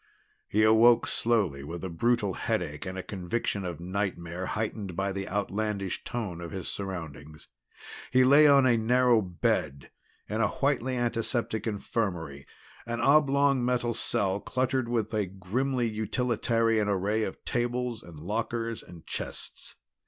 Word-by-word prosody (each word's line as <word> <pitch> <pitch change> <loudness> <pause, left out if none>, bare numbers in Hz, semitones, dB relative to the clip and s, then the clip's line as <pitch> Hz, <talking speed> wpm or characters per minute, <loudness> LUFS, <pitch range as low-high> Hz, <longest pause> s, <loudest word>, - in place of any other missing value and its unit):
He 110 +1 +2
awoke 110 +2 +6
slowly 100 -12 0
with 85 +5 -7
a 95 - -3
brutal 105 +3 +1
headache 75 +3 -2
and 95 0 -5
a 95 - -4
conviction 100 +1 -3
of 85 -3 -5
nightmare 90 -1 -3
heightened 105 -4 -3
by 95 +1 -1
the 95 0 -4
outlandish 100 -1 -2
tone 105 -8 -4
of 85 - -6
his 95 +2 -6
surroundings. 80 -6 -6 0.6
He 130 0 +5
lay 145 +4 +7
on 140 -2 +6
a 120 -2 +4
narrow 120 +1 +4
bed 85 -6 -1 0.4
in 110 +2 -1
a 110 - +4
whitely 130 -1 0
antiseptic 120 -1 -1
infirmary, 90 -9 -3 0.4
an 120 0 -2
oblong 140 -2 +4
metal 120 -1 +1
cell 100 -3 +1
cluttered 130 +1 -1
with 115 -2 -1
a 105 -3 0
grimly 120 +7 -1
utilitarian 115 0 +1
array 100 +3 +1
of - - -4
tables 120 -1 -1
and 85 -6 -12
lockers 115 +5 -3
and 85 -2 -14
chests. - - -5
110 Hz, 140 wpm, -28 LUFS, 95-120 Hz, 0.6 s, lay